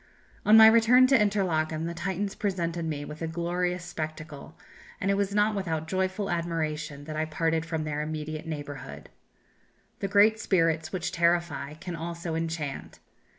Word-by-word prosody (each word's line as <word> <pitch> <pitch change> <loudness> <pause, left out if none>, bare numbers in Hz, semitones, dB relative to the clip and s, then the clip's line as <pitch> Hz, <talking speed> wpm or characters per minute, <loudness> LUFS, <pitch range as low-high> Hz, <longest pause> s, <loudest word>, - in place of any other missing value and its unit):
"On 215 +1 +8
my 220 - +10
return 230 +3 +7
to 265 +1 +4
Interlachen 175 -8 +1
the 170 - -3
Titans 190 +3 -3
presented 170 -4 -2
me 145 -2 -3
with 150 +2 -9
a 165 - -1
glorious 175 +1 -2
spectacle, 155 -3 -7 0.4
and 195 - +1
it - - +3
was 200 0 -1
not 210 +1 +3
without 165 -6 -2
joyful 190 +3 -1
admiration 155 -4 -3
that 155 +1 -7
I 155 +1 0
parted 160 +1 -1
from 160 -2 -2
their 150 -1 -2
immediate 155 +1 -5
neighbourhood. 145 -4 -7 0.9
The 195 - -2
great 210 +2 +4
spirits 165 -6 +1
which 175 -2 -3
terrify 170 -4 0
can 175 +2 -6
also 170 0 -5
enchant. 160 -3 -4
170 Hz, 155 wpm, -27 LUFS, 155-190 Hz, 0.9 s, my